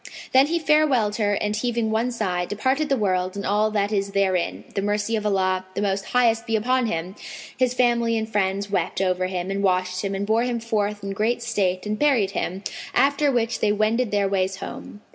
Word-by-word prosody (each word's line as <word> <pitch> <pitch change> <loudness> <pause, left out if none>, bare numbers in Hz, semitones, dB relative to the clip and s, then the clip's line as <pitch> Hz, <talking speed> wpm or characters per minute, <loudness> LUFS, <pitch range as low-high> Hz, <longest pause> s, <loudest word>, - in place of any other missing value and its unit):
Then 265 +2 +6
he 340 +2 0
farewelled 285 -9 +2
her 205 -2 +1
and 210 +1 -1
heaving 230 0 -1
one 225 +3 +1
sigh, 185 -7 -1
departed 260 - -1
the 275 - +2
world 185 -3 0
and 200 - -4
all 210 +2 +2
that 205 -1 0
is 200 -1 -1
therein—the 185 - -1
mercy 205 +2 0
of 210 -1 -1
Allah 185 -2 +1
the - - -1
Most 195 0 -1
Highest 235 -1 +2
be 225 - +1
upon 250 +3 +1
Him! 175 -1 -3 0.4
His 250 -1 +1
family 235 -2 +2
and 220 0 -2
friends 200 -1 -1
wept 200 - -1
over 185 -1 0
him 185 0 -3
and 200 0 -2
washed 185 -1 0
him 195 -1 -2
and 195 +1 -2
bore 220 +2 +2
him 245 -1 -1
forth 210 -3 -2
in 195 - -4
great 225 +4 -1
state 195 -5 -1
and 210 0 -3
buried 255 -10 +3
him; 190 +1 -3 0.3
after 285 +1 +3
which 235 -2 0
they 210 - +2
wended 215 +3 +1
their 205 -1 +1
ways 190 -1 0
home. 205 +1 -9
210 Hz, 205 wpm, -23 LUFS, 195-235 Hz, 0.4 s, Then